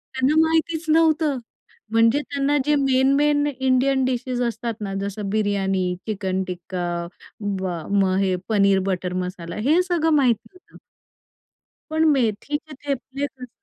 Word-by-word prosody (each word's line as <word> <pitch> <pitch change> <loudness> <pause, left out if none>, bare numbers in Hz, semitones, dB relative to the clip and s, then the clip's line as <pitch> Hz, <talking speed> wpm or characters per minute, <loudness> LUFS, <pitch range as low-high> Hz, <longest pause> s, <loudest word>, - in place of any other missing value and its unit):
त्यांना 260 +3 +2
माहितीच 320 0 +1
नव्हतं 315 -2 +3 0.5
म्हणजे 230 +4 +4
त्यांना 285 0 0
जे 300 0 +3
मेन 265 -1 +3
मेन 290 0 +3
इंडियन 265 +1 +2
डिशेस 250 0 -2
असतात 230 0 -3
ना 195 -2 -4
जसं 200 0 -4
बिर्याणी, 195 -3 0
चिकन 190 -3 -1
टिक्का, 180 0 -4 0.5
म 195 -2 -2 0.3
मग 185 -1 +2
हे 190 -2 +1
पनीर 200 -3 +4
बटर 180 -1 -2
मसाला 180 -2 -4
हे 325 +5 +5
सगळं 345 -3 +1
माहीती 245 -6 +2
होतं. 365 - -18 1.1
पण 315 0 +1
मेथीचे 280 +5 -1
थेपले 275 0 -3
कसं 255 -3 -12
250 Hz, 130 wpm, -23 LUFS, 195-290 Hz, 1.1 s, हे